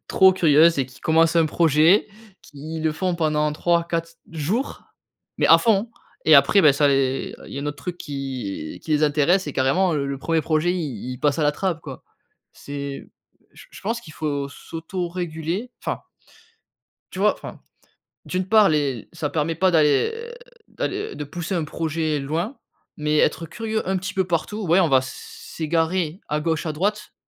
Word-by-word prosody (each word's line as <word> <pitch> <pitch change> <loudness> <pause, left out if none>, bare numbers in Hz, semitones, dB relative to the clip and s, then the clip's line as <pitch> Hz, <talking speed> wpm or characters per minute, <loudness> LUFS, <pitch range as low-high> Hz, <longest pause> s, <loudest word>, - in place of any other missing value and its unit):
trop 190 0 +6
curieuses 165 -3 +5
et 130 - +1
qui 125 -2 -17
commencent 165 +1 +3
un 165 -1 +4
projet, 160 +4 +4 0.3
qui 155 +3 -8
le 160 -1 0
font 180 +3 -1
pendant 155 -2 +1
3-4 170 +1 0 0.2
jours, 175 - -2 0.6
mais - - +3
à - - +8
fond 225 0 +2 0.4
et 155 - +8
après, 140 +9 +6
bah, 150 -5 +6
ça 145 0 +3
les 135 -1 0
il - - -11
y - - -4
a 140 - -4
un - - -4
autre 145 -1 -4
truc 175 +2 -5
qui 130 - -5
qui 160 - -8
les 150 - +2
intéresse 155 +5 +2
et 145 - -4
carrément, 165 +7 +2
heu, 140 -2 -1
le 140 -1 -4
1er 160 +2 0
projet 155 +4 +1
il 130 - -4
il 125 - -8
passe 145 0 +1
à 155 - +1
la 145 - +3
trappe, 170 0 -2
quoi. 135 -5 -9 0.5
C'est 140 -1 -7 0.4
j - - -15
je - - -12
pense 230 +4 -2
qu'il 155 - -12
faut 145 -3 -3
s'autoréguler, 170 - -5
enfin. - - -3 1.1
Tu - - -7
vois? - - +3
Enfin, - - -10 0.6
d'une 185 +1 -3
part 215 -2 +6
les 140 -6 -1
ça 160 -3 -3
permet 160 +2 -1
pas 185 +3 +2
d'aller 175 - +2 0.4
d'alle 415 +3 -4
de 150 - -4
pousser 175 +5 -5
un 165 - 0
projet 155 -1 -2
loin, 165 - -3 0.4
mais 150 0 0
être 165 - +2
curieux 220 +4 -3
un 190 0 0
petit 185 0 -5
peu 190 -1 +1
partout, 190 +4 -2
ouais, 175 +4 +4
on 170 - +3
va 135 -2 +5
s 130 - -7 0.2
s'égarer 165 +2 0
à 150 0 -1
gauche 160 0 -1
à 155 - -1
droite, 205 +7 -2
160 Hz, 185 wpm, -23 LUFS, 145-180 Hz, 1.1 s, à